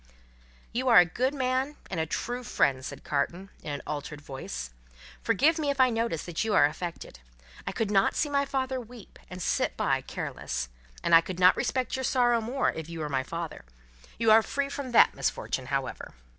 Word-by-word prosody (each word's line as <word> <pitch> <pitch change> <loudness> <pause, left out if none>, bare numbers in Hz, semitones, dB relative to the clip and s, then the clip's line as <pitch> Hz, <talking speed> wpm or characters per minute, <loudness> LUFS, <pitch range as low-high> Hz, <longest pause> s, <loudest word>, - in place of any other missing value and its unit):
"You 255 +3 -1
are 235 - +7
a 180 - +9
good 255 - -1
man 260 +2 0 0.2
and 180 - -2
a 160 - -1
true 245 +9 -3
friend," 135 - +1
said - - -7
Carton, 170 +7 -2
in 150 - -5
an 145 - -4
altered 150 0 -5
voice. 135 - -7 0.5
"Forgive 315 - +3
me 295 -2 0
if 280 -1 -1
I 255 -1 +5
notice 225 -9 -1
that 175 +1 -2
you 220 -2 0
are - - +7
affected. 165 - -5 0.5
I - - 0
could 220 -2 -2
not 195 -1 +3
see 305 - +1
my 280 -1 +1
father 265 -2 -2
weep, 235 -2 -14
and 180 - -8
sit - - 0
by, - - +1
careless. 65 - -4 0.3
And - - +1
I 165 - +9
could 180 +1 -6
not 180 0 +7
respect 255 -1 -1
your 260 - -3
sorrow 240 -2 +3
more, 250 +5 0
if 160 0 -7
you 165 -1 -6
were 150 - -3
my 135 -2 0
father. 165 +4 -6 0.5
You 225 -1 +3
are 220 +1 +8
free 280 +5 -2
from 280 -2 -5
that - - +7
misfortune, - - -2
however." - - -3
220 Hz, 200 wpm, -28 LUFS, 165-255 Hz, 0.5 s, a